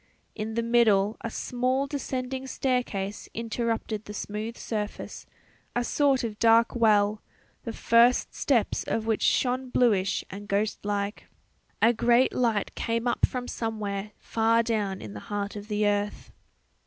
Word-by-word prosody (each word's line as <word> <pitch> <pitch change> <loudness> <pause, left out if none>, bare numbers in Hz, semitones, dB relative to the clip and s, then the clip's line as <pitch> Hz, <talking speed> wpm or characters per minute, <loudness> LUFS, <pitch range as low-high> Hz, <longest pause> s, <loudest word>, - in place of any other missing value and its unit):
In 220 +1 -4
the 235 - 0
middle 220 -3 +3
a 230 - -2
small 255 +4 -1
descending 265 -2 -4
staircase 245 -7 -2
interrupted 225 -1 -2
the 210 - -8
smooth 215 +3 -4
surface 210 -2 -5 0.5
a 245 - +1
sort 275 0 +2
of 215 -2 -4
dark 230 +1 +5
well, 210 -2 +3 0.4
the 230 - -3
first 235 +2 +3
steps 245 -6 +1
of 220 - -2
which 225 -1 0
shone 255 0 +1
bluish 205 -7 +2
and 205 +2 -8
ghost 205 +1 -1
like. 205 0 -3 0.6
A 235 - +6
great 240 +2 +3
light 230 -5 0
came 230 +1 -1
up 240 - +2
from 250 -1 -5
somewhere 210 -4 -3
far 230 +1 +2
down 210 -4 -1
in 105 -2 -8
the 105 - -7
heart 205 0 -3
of 205 0 -7
the 210 -1 0
earth. 205 0 -1
225 Hz, 145 wpm, -27 LUFS, 205-240 Hz, 0.6 s, A